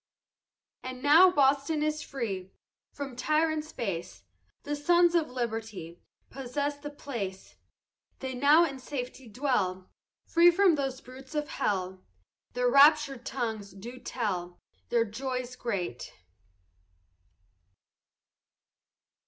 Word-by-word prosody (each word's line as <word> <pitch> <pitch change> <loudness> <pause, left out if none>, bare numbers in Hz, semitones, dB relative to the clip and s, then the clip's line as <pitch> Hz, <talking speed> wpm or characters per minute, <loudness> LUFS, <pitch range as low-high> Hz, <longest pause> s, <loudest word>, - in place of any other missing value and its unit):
And 255 0 -7
now 320 +6 +8
Boston 285 -1 +2
is 305 0 -1
free 200 -9 -4 0.4
From 275 -3 -6
tyrants 310 +3 0
base, 170 - -5 0.4
The 295 +1 -2
sons 345 +3 +4
of 330 -3 +2
liberty 225 -8 -5 0.3
Possess 285 +2 -3
the 290 0 -7
place; 230 -10 -6 0.6
They 265 -1 -5
now 290 +6 +5
in 275 -4 -5
safety 255 -2 -6
dwell. 205 -7 -1 0.3
Free 340 +1 +6
from 365 +1 +4
those 270 -3 -2
brutes 260 +4 -12
of 300 0 -1
hell, 185 -2 -2 0.5
Their 245 0 +1
raptur'd 280 -2 +5
tongues 220 -6 -4
do 235 +6 -9
tell 180 -9 -3 0.3
Their 235 -1 +2
joys 250 +2 -4
great. 190 - -4
260 Hz, 105 wpm, -29 LUFS, 220-295 Hz, 0.6 s, now